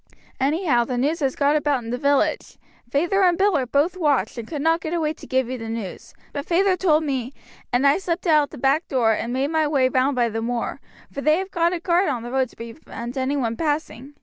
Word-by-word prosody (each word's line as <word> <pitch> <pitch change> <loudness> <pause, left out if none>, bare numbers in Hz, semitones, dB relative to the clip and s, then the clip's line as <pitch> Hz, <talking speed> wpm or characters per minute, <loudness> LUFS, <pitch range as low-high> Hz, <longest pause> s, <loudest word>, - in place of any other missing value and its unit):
Anyhow, 280 -2 +2
the 250 0 -3
news 295 +7 0
has 270 -4 0
got 285 +1 +2
about 290 -4 +1
in 230 - -6
the 245 - -1
village. 285 -1 +1 0.3
Feyther 345 +9 +1
and 355 -2 +4
Bill 395 -1 +3
are 260 -3 0
both 290 +8 +1
watched, 290 - +1
and 225 - -7
could 290 0 -4
not 325 +1 +2
get 320 +2 -3
away 310 -2 0
to - - -13
give 260 -1 +1
you 255 0 -5
the 225 0 -6
news; 225 -5 -6 0.2
but 285 0 -5
feyther 370 +2 +3
told 320 -4 +2
me, 265 -3 -3 0.4
and 245 +3 +2
I 280 +5 +4
slipped 355 -1 -3
out 305 -3 +4
at - - -23
the - - -11
back 275 +6 +1
door 235 -4 +2
and 230 +2 -3
made 270 +4 -1
my 315 -1 +2
way 270 -4 +2
round 260 +2 +1
by 240 -1 +2
the 225 +1 -3
moor, 235 0 -3 0.3
for 280 - -5
they 305 +2 +3
have 385 +1 -4
got 340 -1 +2
a 360 - -2
guard 350 +2 +2
on 240 -3 -2
the 240 - -6
road 260 -1 +1
to - - -20
prevent 235 0 -8
any 270 +2 -1
one 230 -4 -1
passing. 290 -2 -3
280 Hz, 250 wpm, -23 LUFS, 250-325 Hz, 0.4 s, and